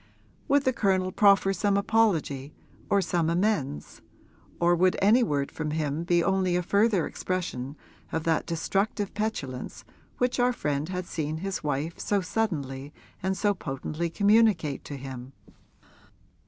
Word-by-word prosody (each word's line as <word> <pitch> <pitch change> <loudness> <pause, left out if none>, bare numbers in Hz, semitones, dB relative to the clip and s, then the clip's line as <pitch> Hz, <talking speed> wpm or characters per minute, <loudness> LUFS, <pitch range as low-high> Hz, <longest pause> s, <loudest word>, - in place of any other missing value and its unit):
Would 285 -1 +3
the 260 - +2
Colonel 190 -4 +1
proffer 195 -1 +4
some 200 +1 +1
apology 170 -10 +1 0.3
or 200 -1 +3
some 170 -1 0
amends, 170 - -1 0.6
or 175 0 +4
would 185 +1 +3
any 215 +6 +5
word 145 - 0
from 155 -1 -4
him 155 +1 -2
be 175 -1 +3
only 190 -2 +1
a 180 - +1
further 200 -1 +2
expression 150 -7 -4 0.3
of 160 - -2
that 165 -1 0
destructive 195 +5 -1
petulance 175 - -4 0.3
which 250 0 0
our 250 0 +3
friend 150 -5 -2
had 180 -1 -3
seen 155 -2 -3
his 195 +1 -4
wife 150 +3 -2
so 205 - +1
suddenly 150 -10 -2 0.3
and 190 +1 -1
so 205 -1 +2
potently 155 0 -4
communicate 200 -6 +3
to 140 - -6
him? 130 -1 -8
175 Hz, 140 wpm, -27 LUFS, 150-200 Hz, 0.6 s, any